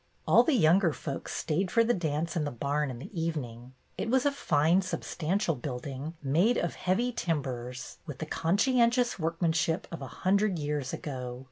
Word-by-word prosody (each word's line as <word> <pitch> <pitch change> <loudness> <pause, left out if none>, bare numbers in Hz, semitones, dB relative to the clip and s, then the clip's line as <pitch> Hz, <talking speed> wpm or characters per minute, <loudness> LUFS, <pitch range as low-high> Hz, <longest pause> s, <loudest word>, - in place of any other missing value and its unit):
All - - +7
the 315 - +2
younger 170 -3 +4
folks 140 -2 -5
stayed 175 +4 0
for 230 - +4
the 240 +1 +2
dance 165 -2 -2
in 160 - +1
the 145 - -1
barn 145 +3 -1
in 125 - -6
the 165 - -6
evening. 130 -6 -4 0.2
It - - -2
was 260 +2 +3
a 285 - +4
fine, 165 - +2
sub 185 - -3
stantial 165 - -1
building, 140 +4 -5
made 170 - +3
of 170 - -1
heavy 230 +7 0
timbers, 130 - -3
with 145 -4 -6
the 160 - -4
conscientious 235 - +2
workmanship 165 0 0
of 170 - -6
a 135 - -5 0.2
hundred 200 0 +3
years 145 -3 -2
ago. 125 -4 -5
160 Hz, 175 wpm, -29 LUFS, 140-190 Hz, 0.2 s, All